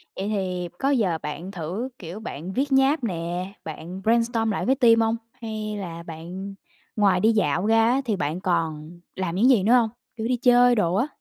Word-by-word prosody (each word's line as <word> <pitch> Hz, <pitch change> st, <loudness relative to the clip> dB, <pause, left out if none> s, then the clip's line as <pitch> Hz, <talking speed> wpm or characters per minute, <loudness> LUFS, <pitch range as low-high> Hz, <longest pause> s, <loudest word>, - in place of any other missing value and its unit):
Vậy 195 Hz, +2 st, -3 dB
thì 180 Hz, -4 st, -2 dB
có 275 Hz, -, 0 dB
bao 285 Hz, -, +3 dB
giờ 190 Hz, -10 st, +1 dB
bạn 160 Hz, +6 st, -5 dB
thử, 190 Hz, +9 st, -4 dB
kiểu, 175 Hz, +4 st, -7 dB
bạn 185 Hz, -4 st, -6 dB
viết 275 Hz, +2 st, -1 dB
nháp 270 Hz, +1 st, +3 dB
nè, 180 Hz, 0 st, -3 dB
bạn 170 Hz, +4 st, -7 dB
brainstorm 230 Hz, 0 st, +2 dB
lại -, -, -2 dB
với 265 Hz, +2 st, +3 dB
team 230 Hz, -3 st, +5 dB
hông? 225 Hz, +1 st, +2 dB, 0.3 s
Hay 215 Hz, -2 st, -4 dB
là 170 Hz, -3 st, -6 dB
bạn 175 Hz, +5 st, -8 dB, 0.4 s
ngoài 195 Hz, -4 st, +3 dB
đi 220 Hz, +3 st, +4 dB
dạo 185 Hz, -3 st, +1 dB
ra 225 Hz, 0 st, +4 dB
á 270 Hz, +2 st, +2 dB
thì 215 Hz, -4 st, 0 dB
bạn 155 Hz, +1 st, -2 dB
còn 165 Hz, -2 st, -2 dB, 0.2 s
làm 185 Hz, -2 st, -3 dB
những 240 Hz, +7 st, +4 dB
gì 220 Hz, -8 st, +4 dB
nữa 230 Hz, +4 st, +4 dB
hông? 235 Hz, -3 st, +4 dB, 0.3 s
Kiểu 220 Hz, +1 st, -2 dB
đi 250 Hz, -1 st, +1 dB
chơi 245 Hz, -1 st, +5 dB
đồ 180 Hz, -4 st, +1 dB
á? 250 Hz, +8 st, +1 dB
200 Hz, 210 wpm, -24 LUFS, 175-230 Hz, 0.4 s, team